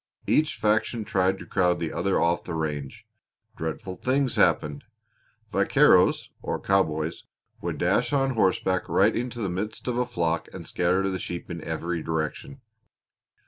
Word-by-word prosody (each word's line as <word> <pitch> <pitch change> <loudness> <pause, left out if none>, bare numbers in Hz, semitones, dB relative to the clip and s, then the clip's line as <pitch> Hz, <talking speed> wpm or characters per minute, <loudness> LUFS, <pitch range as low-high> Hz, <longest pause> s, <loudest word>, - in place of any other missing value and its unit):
Each 155 0 +2
faction 110 +1 0
tried 95 -1 +1
to - - -10
crowd 90 -2 +1
the 80 -2 -3
other 95 +2 +1
off 85 +1 +1
the 85 - -5
range. 75 -4 -4 0.5
Dreadful 90 +4 -5
things 130 0 0
happened. 75 -1 +2 0.7
Vaqueros, - - +4
or - - -3
cowboys, 80 -5 0 0.4
would - - -3
dash - - +1
on 135 -2 +2
horseback 95 -4 +1
right 105 +3 +3
into 120 0 -3
the 100 - 0
midst 100 +7 -4
of 120 -1 -1
a 125 0 +1
flock 85 -8 -1
and - - -7
scatter 90 +2 +1
the 95 - -3
sheep 85 0 -5
in 85 -2 -6
every 85 +1 -3
direction. 80 - -4
95 Hz, 150 wpm, -26 LUFS, 85-110 Hz, 0.7 s, Vaqueros